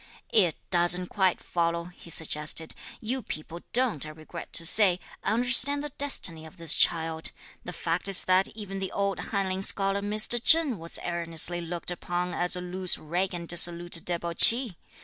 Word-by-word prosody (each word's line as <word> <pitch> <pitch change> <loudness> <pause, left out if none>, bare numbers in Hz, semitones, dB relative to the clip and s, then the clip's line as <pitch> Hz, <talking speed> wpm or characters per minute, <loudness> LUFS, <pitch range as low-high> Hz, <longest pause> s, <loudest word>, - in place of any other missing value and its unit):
"It 180 -8 +3 0.2
doesn't 175 0 +1
quite 190 -3 0
follow," 170 -1 -2
he 175 -1 -15
suggested. 160 0 -2 0.3
"You 255 +4 -3
people 165 -4 -8
don't, 245 - 0
I 155 - -8
regret 155 +2 -11
to 165 - +1
say, 185 0 +4 0.2
understand 245 +5 +2
the 295 - -5
destiny 260 - +2
of 160 +4 -14
this 165 -3 +3
child. 160 -1 0 0.3
The 180 - -6
fact 170 +2 -3
is 195 -2 +6
that 185 +1 +3
even 195 -3 -7
the 190 -1 -5
old 200 -1 -2
Hanlin 190 -2 -3
scholar 195 0 +1
Mr. 215 +3 +3
Cheng 310 - +3
was 165 +1 -3
erroneously 170 0 -1
looked 170 +1 -6
upon 175 +1 -4
as 180 0 +1
a 180 - -5
loose 180 0 0
rake 180 +4 -3
and 170 -1 -7
dissolute 175 0 0
debauchee! 175 +6 +5
180 Hz, 165 wpm, -26 LUFS, 170-200 Hz, 0.3 s, is